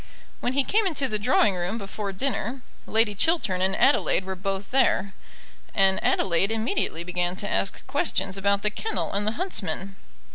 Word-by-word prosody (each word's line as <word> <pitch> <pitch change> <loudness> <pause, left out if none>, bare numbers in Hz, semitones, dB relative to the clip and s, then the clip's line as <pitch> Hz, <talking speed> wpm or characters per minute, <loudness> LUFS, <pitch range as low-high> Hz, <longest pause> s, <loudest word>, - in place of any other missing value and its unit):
When 245 - -1
he 275 +1 +2
came 420 +7 +2
into 290 -6 0
the 215 -4 -2
drawing 215 -2 +3
room 180 +4 -2
before 200 -1 -5
dinner, 250 +3 -2 0.2
Lady 220 -1 +3
Chiltern 205 - +1
and 190 +1 +2
Adelaide 190 - +3
were 190 - -3
both 195 +1 -4
there, 200 -7 +2 0.6
and 195 -2 +3
Adelaide 190 +2 +2
immediately 225 - -1
began 180 0 -1
to 205 +2 -4
ask 195 - -1
questions 195 -1 -1
about 200 +1 +1
the 210 - +1
kennel 440 - -2
and 205 +1 -1
the 215 - +1
huntsmen. 195 - -3
200 Hz, 170 wpm, -25 LUFS, 190-235 Hz, 0.6 s, drawing